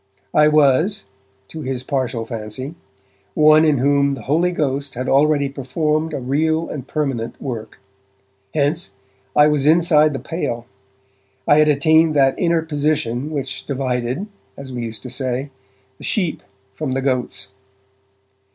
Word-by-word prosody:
I 150 0 +5
was, 150 - +3 0.4
to 160 - -7
his 130 -2 -3
partial 130 -4 -2
fancy, 115 +5 -6 0.6
one 155 0 +6
in 155 -3 +3
whom 140 +1 +2
the 120 - -10
Holy 165 +8 +1
Ghost 140 -4 -2
had 130 +2 -3
already 145 +1 +3
performed 150 +4 -1
a - - -3
real 160 +5 0
and 135 -3 -6
permanent 135 -7 -3
work. 115 -5 -6 0.8
Hence, 150 - 0 0.4
I 150 - +7
was 150 -2 +2
inside 155 -2 +4
the - - -2
pale; 120 -9 -4 0.8
I 145 - +6
had 155 - +5
attained 155 +2 +4
that 135 -2 +4
inner 170 -2 +2
position 145 -4 -1
which 140 -4 -5
divided, 130 +3 -2 0.3
as 135 -2 -8
we 120 - -4
used 110 -1 -7
to 125 - -7
say, 130 +1 -3 0.5
the - - -12
Sheep 180 -7 -1 0.3
from 130 +6 -3
the 135 - -1
Goats. 125 -6 -1
140 Hz, 140 wpm, -20 LUFS, 130-155 Hz, 0.8 s, I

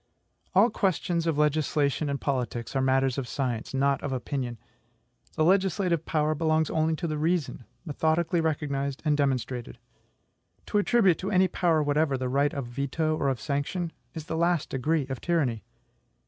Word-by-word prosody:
All 210 +5 +5
questions 175 -4 0
of 160 -3 +1
legislation 150 -1 +1
and 140 0 -2
politics 125 -3 -3
are 135 - +2
matters 130 0 +2
of 130 - -4
science, 125 -4 -3
not 140 0 +1
of 145 - -3
opinion. 125 -2 -3 0.8
The 155 - +2
legislative 185 -2 +2
power 155 -1 +1
belongs 155 0 +1
only 160 0 +1
to 170 - -4
the 155 -2 -2
reason, 160 -6 -1 0.2
methodically 160 +2 +1
recognized 140 -3 -2
and 150 -1 +3
demonstrated. 130 -4 -1 0.9
To 210 - +1
attribute 205 -5 +3
to 190 - -3
any 190 -2 +4
power 165 -4 +1
whatever 145 -1 +1
the 130 0 -2
right 140 +2 +2
of 140 -3 -4
veto 140 +6 -1
or 140 -3 0
of 130 -3 -2
sanction, 145 - -2 0.2
is 160 -2 -6
the 160 - -4
last 170 -1 +1
degree 145 +3 0
of 130 -1 -6
tyranny. 140 -10 0
150 Hz, 160 wpm, -27 LUFS, 135-165 Hz, 0.9 s, All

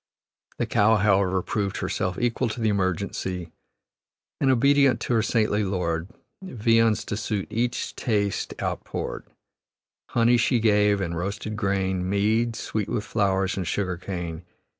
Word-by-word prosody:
The - - 0
cow, 110 +2 +3
however, 95 -3 +2
proved 100 -2 -2
herself 90 -1 -2
equal 120 0 0
to 110 - -5
the 110 -1 +1
emergency, 95 -3 -2 0.9
and 135 - +2
"Obedient 135 -1 +4
to - - -1
her 115 - +3
saintly 110 -2 +1
lord, 90 -4 -1 0.3
Viands 115 - +2
to - - -3
suit 105 -1 -2
each 120 +2 -2
taste 100 -4 -1
outpoured. - - -4 0.8
Honey 120 +1 +4
she 120 +1 +2
gave, 105 -2 +3
and 85 -2 -2
roasted 100 +4 -4
grain, 95 -3 -1
Mead, 110 +4 +1
sweet 110 -3 -3
with 115 -4 -1
flowers, 95 -3 0
and 95 -3 -2
sugar 95 +2 -1
cane. 85 -3 -5
105 Hz, 140 wpm, -25 LUFS, 95-115 Hz, 0.9 s, Obedient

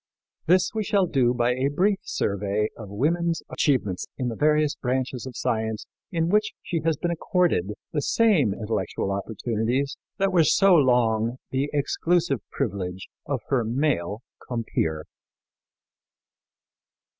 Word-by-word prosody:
This 180 +2 +4
we 220 -1 -1
shall 200 -1 +2
do 130 -7 +2
by 120 0 +1
a 130 +2 0
brief 190 +7 +1
survey 100 +2 -1
of 105 -4 -9
woman's 165 - 0
achievements 110 -11 0
in 125 -2 -1
the 115 - -4
various 150 +1 +3
branches 130 0 -2
of 125 - -8
science 110 -3 -2 0.3
in 165 -2 0
which 210 +2 +2
she 165 -2 -2
has 160 -2 +1
been 175 - -1
accorded 170 - +1 0.2
the 150 - 0
same 190 - +3
intellectual 100 -2 -2
opportunities 115 +6 -1 0.2
that 195 0 +1
were 170 -3 +5
so 195 +4 +5
long 120 -5 +3
the 135 +2 0
exclusive 155 0 +1
privilege 95 -1 -3 0.2
of 135 -5 -1
her 130 -4 +2
male 115 - -1 0.2
compeer. 95 -10 -2
130 Hz, 135 wpm, -25 LUFS, 110-165 Hz, 0.3 s, were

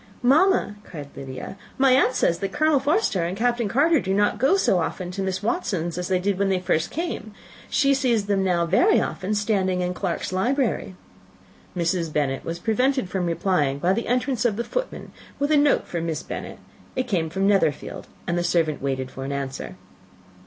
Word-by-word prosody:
"Mamma," 290 - +3
cried 145 -8 -9
Lydia, 135 +7 -7 0.2
"my 265 0 +4
aunt 255 0 +4
says 170 -8 +2
that 195 -1 -3
Colonel 310 +1 +3
Forster 290 - +1
and 175 +3 -3
Captain 240 0 +1
Carter 300 +7 +3
do 190 -3 -1
not 205 +1 +2
go 275 +10 +4
so 190 - +2
often 175 +2 -3
to 195 +2 -4
Miss 190 0 -2
Watson's 185 - -1
as 180 0 -3
they 185 - +2
did 190 +1 -1
when 200 -1 +2
they 190 -1 +1
first 165 -2 0
came; 325 - -4 0.3
she 275 -1 +3
sees 245 -6 +1
them 200 -1 +1
now 175 -2 +2
very 350 - +4
often 195 +3 -2
standing 195 -3 +1
in 180 0 -1
Clarke's 180 -1 -3
library." 240 -1 0 0.8
Mrs. 170 -1 0
Bennet 140 -3 -1
was 165 +1 -4
prevented 225 +1 0
replying 170 -5 0
by 175 +6 +2
the 230 - -2
entrance 250 0 0
of 235 -4 +2
the 235 - -2
footman - - -4 0.3
with 285 +2 0
a - - +5
note 290 0 +3
for 170 - -4
Miss 165 -2 -3
Bennet; - - -6 0.4
it 255 -1 -1
came 170 -8 0
from 190 +4 -1
Netherfield, 190 -8 0 0.2
and 175 0 0
the - - -1
servant 165 -3 +1
waited 130 -1 -2
for 135 - -7
an 135 - -4
answer. 135 -1 -4
195 Hz, 190 wpm, -24 LUFS, 170-250 Hz, 0.8 s, a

